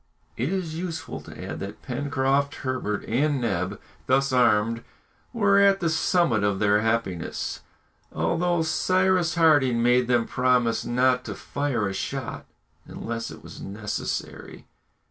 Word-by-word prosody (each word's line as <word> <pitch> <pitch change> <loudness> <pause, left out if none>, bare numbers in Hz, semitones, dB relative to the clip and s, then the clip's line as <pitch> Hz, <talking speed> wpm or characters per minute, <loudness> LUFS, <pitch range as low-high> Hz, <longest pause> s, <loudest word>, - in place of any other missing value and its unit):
It 130 +8 -1
is 185 -5 -2
useless 165 -4 -5
to - - -9
add - - -5
that 100 +2 -7
Pencroft, 140 +1 0
Herbert, 125 -6 -2
and 140 +4 +1
Neb, 100 -6 -2 0.3
thus 135 +1 +2
armed, 115 -2 +3 0.5
were 200 -4 +3
at 200 -1 +5
the 165 -3 0
summit 160 - +2
of 100 -1 +1
their 105 +1 +3
happiness, 110 -6 -2 0.5
although 175 0 0
Cyrus 185 +1 +2
Harding 145 -8 +4
made 125 0 +3
them 120 -2 +2
promise 125 -2 +1
not 125 +1 +2
to - - -5
fire 140 -7 -2
a 95 - -3
shot 95 - -5 0.4
unless 115 0 -5
it - - -11
was - - -11
necessary. 105 +1 -5
130 Hz, 135 wpm, -25 LUFS, 115-160 Hz, 0.5 s, at